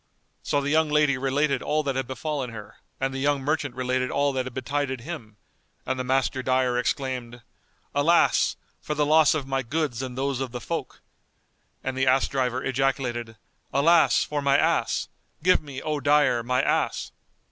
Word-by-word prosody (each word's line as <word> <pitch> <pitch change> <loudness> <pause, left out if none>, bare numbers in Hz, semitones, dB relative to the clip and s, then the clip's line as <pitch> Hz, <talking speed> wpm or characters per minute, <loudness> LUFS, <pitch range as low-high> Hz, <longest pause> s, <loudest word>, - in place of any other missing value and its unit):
So 145 - 0
the 140 +1 -2
young 160 0 +3
lady 150 -2 +3
related 135 +1 0
all 155 0 0
that 135 -2 -2
had 130 -2 -2
befallen 135 0 -3
her 105 -3 -10 0.2
and 135 0 -1
the 135 - -4
young 145 +1 +1
merchant 145 -3 -1
related 130 0 -1
all 140 0 +1
that 130 -1 -2
had 130 - -8
betided 130 -1 -2
him, 115 -8 -8 0.5
and 130 - -2
the - - -1
Master 130 0 0
dyer 130 -1 +1
exclaimed, 125 -2 -3 0.5
"Alas, 155 +5 +3 0.3
for 150 - -3
the 150 0 +2
loss 155 0 +5
of 145 -4 -2
my 135 0 -1
goods 135 -1 -2
and 130 -1 -6
those 135 -1 -1
of 130 -2 -4
the 125 - -4
folk!"; 150 +3 -5 0.8
and 130 0 -3
the 130 0 0
ass 130 +1 +4
driver 130 -1 -1
ejaculated, 125 -4 -1 0.3
"Alas, 165 +4 +4
for 150 -1 -3
my 140 0 +3
ass! - - +1 0.4
Give 185 +1 +4
me, 140 -3 -8
O 155 -1 -1
dyer, 145 -3 +3
my 125 +2 0
ass!" - - 0
135 Hz, 180 wpm, -25 LUFS, 130-145 Hz, 0.8 s, loss